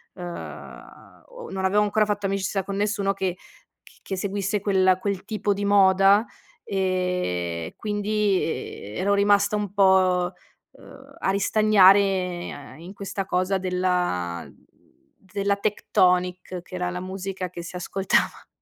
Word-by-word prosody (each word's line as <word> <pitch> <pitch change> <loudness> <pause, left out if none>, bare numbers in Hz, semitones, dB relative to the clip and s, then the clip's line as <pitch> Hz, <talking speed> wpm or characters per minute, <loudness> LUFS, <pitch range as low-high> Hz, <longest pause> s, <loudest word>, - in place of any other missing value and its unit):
ehm, 175 -2 -10
o - - -10
non 190 0 -2
avevo 205 +2 +3
ancora 210 +1 +2
fatto 205 -1 -2
amicizia 195 0 -1
con 195 +1 -5
nessuno 205 -1 0
che 190 -2 -2 0.5
c - - -20
che 190 - -5
seguisse 200 +1 -1
quella 190 -2 +3
quel 195 -1 -3
tipo 210 -1 -1
di 200 +1 -3
moda. 195 +1 +5 0.4
E 180 - -2
quindi, 210 -1 0
eh, 105 -9 -5
ero 200 +3 +1
rimasta 200 +1 +3
un 205 -2 -2
po', 185 -2 +3 0.4
uhm, - - -16
a - - -1
ristagnare 195 -5 +3
in 170 +3 -10
questa 195 0 -4
cosa 185 +2 +1
della 180 - -1
mhmm, - - -18 0.7
della 200 0 0
Tecktonik, 180 -3 0
che - - -18
era 180 -1 -2
la 180 0 -4
musica 190 0 -5
che 175 - -7
si 170 - -9
ascoltava. 190 +2 -1
190 Hz, 135 wpm, -24 LUFS, 180-200 Hz, 0.7 s, moda